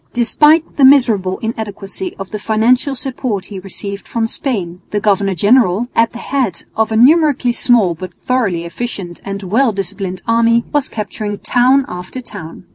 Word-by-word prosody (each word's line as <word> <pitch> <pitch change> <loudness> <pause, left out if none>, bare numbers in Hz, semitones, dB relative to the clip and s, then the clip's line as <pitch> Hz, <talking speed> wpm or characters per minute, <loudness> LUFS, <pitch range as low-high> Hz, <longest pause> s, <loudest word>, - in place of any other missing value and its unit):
Despite 295 +7 +3
the 280 - +3
miserable 230 -9 +4
inadequacy 220 - -5
of 195 -1 -8
the 210 - -4
financial 240 +6 +1
support 245 -7 -3
he 200 -2 -8
received 200 +1 -6
from 230 -1 -1
Spain, 195 -8 -3
the 210 - -1
governor 200 -2 +1
general, 220 +3 +3
at 230 0 +3
the 235 - -10
head 240 -9 -2
of 220 0 0
a - - 0
numerically 280 -1 +4
small 235 -7 +3
but 185 +3 -8
thoroughly 200 -6 -1
efficient 180 -2 -6
and 200 0 -5
well 225 +7 +2
disciplined 190 -2 -4
army, 230 +1 +3
was 290 -2 0
capturing 210 -1 -4
town 255 +5 +3
after 180 +7 -7
town. 190 -8 -10
220 Hz, 160 wpm, -16 LUFS, 195-250 Hz, -, miserable